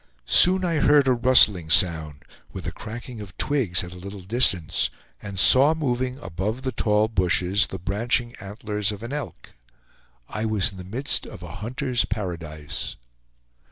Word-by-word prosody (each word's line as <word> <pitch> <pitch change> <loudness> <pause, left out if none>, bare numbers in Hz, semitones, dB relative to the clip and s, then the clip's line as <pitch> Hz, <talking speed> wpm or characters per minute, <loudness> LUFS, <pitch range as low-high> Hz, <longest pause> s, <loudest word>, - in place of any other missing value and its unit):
Soon 185 - +5
I 165 -2 -1
heard 145 -1 +3
a 130 - +4
rustling 115 -9 +4
sound, 80 -5 +2 0.3
with - - -8
a - - -3
cracking 115 +1 -9
of 95 -3 -12
twigs 120 -13 +1
at 90 0 -9
a 90 - -11
little 100 +2 -9
distance, 95 -5 +1 0.3
and 100 -2 -8
saw 135 - +5
moving 130 -4 -2
above 95 +8 -4
the 130 - -2
tall 105 -3 +1
bushes 95 -1 +1
the 95 - -7
branching 115 +6 -1
antlers 105 +1 -4
of 105 +1 -9
an 120 +4 -6
elk. 145 -4 -8 0.7
I 105 - -5
was 110 -1 0
in 95 - -13
the 90 - -8
midst 115 +10 -2
of - - -11
a - - -9
hunter's 125 +2 -2
paradise. 85 -8 -5
105 Hz, 160 wpm, -23 LUFS, 95-125 Hz, 0.7 s, Soon